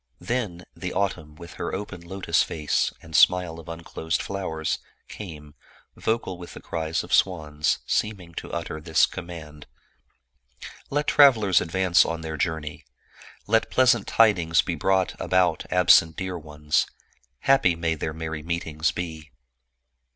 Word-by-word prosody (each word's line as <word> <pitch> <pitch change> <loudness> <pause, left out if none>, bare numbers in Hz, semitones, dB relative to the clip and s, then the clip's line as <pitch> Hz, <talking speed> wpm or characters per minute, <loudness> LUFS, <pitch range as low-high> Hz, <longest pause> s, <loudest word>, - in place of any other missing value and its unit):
Then 105 -8 -3
the 90 +1 -5
autumn 80 -6 -2
with 85 +2 -11
her 85 - -2
open 95 -3 -6
lotus 95 +3 0
face, 75 -3 0
and 80 -1 -9
smile 90 -2 +4
of 80 - -11
unclosed 85 0 -3
flowers, 80 -5 -3 0.3
came, 75 -7 -9 0.4
vocal 110 -5 -2
with 85 - -10
the - - -8
cries 80 -1 -3
of - - -6
swans, 75 -5 +2
seem 105 -1 0
ing 85 -2 -14
to - - -7
utter 85 -2 -4
this 80 0 +4
command, 80 -5 -9 0.6
" 65 0 -16
Let 145 +1 0
travelers 115 -12 +5
advance 90 0 +3
on 80 0 -3
their 80 -1 -5
journey; 80 -1 -3 0.6
let 110 +2 +2
pleasant 120 -4 +3
tidings 90 -8 +4
be 90 - -2
brought 95 +3 +1
about 90 -3 +1
absent 90 -3 +5
dear 95 -1 -3
ones; 75 -2 -1 0.5
happy 135 -11 +4
may 80 0 0
their 80 0 -3
merry 80 0 -5
meetings 80 -2 -1
be 80 -3 -6
85 Hz, 145 wpm, -25 LUFS, 80-95 Hz, 0.6 s, travelers